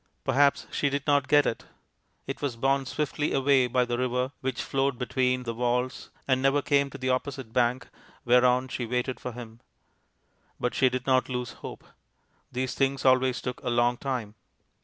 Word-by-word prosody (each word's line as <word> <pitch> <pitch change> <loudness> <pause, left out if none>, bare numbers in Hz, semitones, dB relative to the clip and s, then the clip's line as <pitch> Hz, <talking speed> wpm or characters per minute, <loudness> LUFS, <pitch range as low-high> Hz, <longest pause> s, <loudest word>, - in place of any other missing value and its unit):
Perhaps 140 0 +3
she 145 - 0
did 140 0 -3
not 145 -2 +2
get 145 -1 +5
it; 115 - -2 0.6
it - - -5
was 140 -5 -2
borne 135 +2 +1
swiftly 150 +1 -2
away 135 -1 +3
by 125 +1 +2
the 120 0 -2
river 125 +1 0
which 130 -1 -2
flowed 135 -1 0
beneath 125 0 0
the 115 - -2
walls, 125 +2 -1 0.2
and 130 -1 +2
never 135 +1 +2
came 140 -1 +2
to 135 - -9
the 130 -1 -1
opposite 130 -2 -3
bank, 125 +1 +1 0.4
whereon 125 +1 +4
she 125 -2 -4
waited 125 +2 -2
for 125 - -6
him. 115 -1 -10 1.0
But 125 - -1
she 130 - +3
did 130 +1 -4
not 130 -1 +2
lose 125 -1 -3
hope. - - -9 0.7
These 130 0 -2
things 135 0 0
always 130 -1 +4
took 125 0 -4
a 130 - -3
long 120 0 +2
time. 125 -7 -3
130 Hz, 180 wpm, -27 LUFS, 125-135 Hz, 1.0 s, get